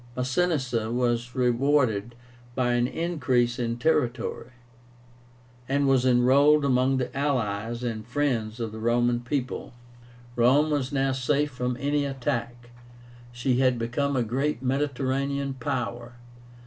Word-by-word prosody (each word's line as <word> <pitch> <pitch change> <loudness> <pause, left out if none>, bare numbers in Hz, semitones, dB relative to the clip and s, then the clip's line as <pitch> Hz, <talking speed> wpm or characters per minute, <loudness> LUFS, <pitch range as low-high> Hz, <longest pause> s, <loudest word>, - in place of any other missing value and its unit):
Masinissa 130 -4 0
was 120 0 -1
rewarded 125 -3 +1 0.4
by 125 -2 +1
an 120 0 +2
increase 130 -7 0
in 115 -1 -2
territory, 125 -5 -1 1.2
and 140 +1 +2
was 130 -1 +3
enrolled 140 +4 +4
among 130 0 +2
the 130 +1 -3
"allies 120 -4 -1
and 115 -3 -3
friends 125 -5 -1
of 115 -2 -3
the 110 - -8
Roman 120 +1 +1
people." 125 +1 -4 0.6
Rome 135 +6 +4
was 140 -2 -1
now 135 -1 +1
safe 140 +3 0
from 125 -1 -3
any 145 +2 0
attack. 120 -3 -4 0.6
She 120 +1 0
had 130 -2 +3
become 130 +5 -1
a 125 - +2
great 135 +4 -2
Mediterranean 140 0 -1
power. 120 -4 -3
125 Hz, 120 wpm, -26 LUFS, 120-140 Hz, 1.2 s, enrolled